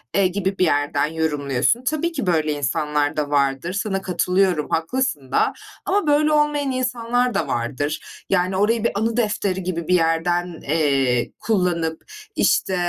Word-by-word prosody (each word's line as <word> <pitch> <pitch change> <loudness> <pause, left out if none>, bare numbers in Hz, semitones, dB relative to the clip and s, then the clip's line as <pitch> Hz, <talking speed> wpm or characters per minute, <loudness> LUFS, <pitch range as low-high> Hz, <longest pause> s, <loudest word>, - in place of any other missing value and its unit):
eee, 195 -1 +4
gibi 190 +1 -2
bir 185 - +3
yerden 145 -2 +1
yorumluyorsun. 150 - 0
Tabii 310 +5 -1
ki 275 - -4
böyle 155 -3 +2
insanlar 145 +2 -1
da 150 -1 -1
vardır, 140 +4 0
sana 195 -1 -2
katılıyorum 180 -2 +1
haklısın 165 - -1
da. - - +2 0.3
Ama 395 -3 +1
böyle 300 +1 +3
olmayan 295 -2 +2
insanlar 245 -1 0
da - - -1
vardır. 145 +6 -2 0.3
Yani 185 0 +1
orayı 215 +3 +2
bir 235 - +2
anı 225 +2 -1
defteri 205 -4 0
gibi 170 -2 -3
bir 180 - +4
yerden, 175 +1 0
eee, 135 -5 +1
kullanıp, 175 -6 0 0.3
işte, 190 - +2
180 Hz, 150 wpm, -22 LUFS, 150-230 Hz, 0.3 s, eee